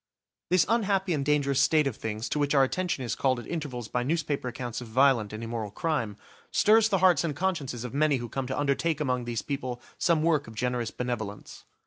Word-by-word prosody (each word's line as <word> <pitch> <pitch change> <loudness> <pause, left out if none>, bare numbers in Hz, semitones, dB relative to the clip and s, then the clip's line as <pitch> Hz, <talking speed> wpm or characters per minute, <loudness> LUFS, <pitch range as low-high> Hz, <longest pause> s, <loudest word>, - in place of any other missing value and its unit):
This 185 0 +4
unhappy 195 -4 +1
and 145 -3 -1
dangerous 140 -1 +2
state 155 +2 +4
of 135 -5 -1
things, 110 +1 -4
to 150 - -1
which 145 0 +1
our 135 - +6
attention 175 0 -1
is 115 -3 -2
called 130 -2 +1
at - - -8
intervals 140 -9 -4
by 125 - -1
newspaper 145 -1 -1
accounts 120 -1 -5
of 120 - -8
violent 120 -2 +3
and 110 +1 -6
immoral 115 -2 -4
crime, 115 - -2 0.3
stirs 220 +1 +4
the 195 - +2
hearts 175 -5 +5
and 155 -4 -2
consciences 145 -9 -2
of 125 - -6
many 145 0 +3
who 120 -1 -5
come 130 +3 -4
to 130 - -2
undertake 145 +2 0
among 125 -4 -1
these 120 -2 -3
people 130 -4 -4 0.2
some 165 -3 +2
work 155 -5 +2
of 110 - -10
generous 125 -1 -1
benevolence. 110 -5 -5
135 Hz, 210 wpm, -28 LUFS, 120-155 Hz, 0.3 s, our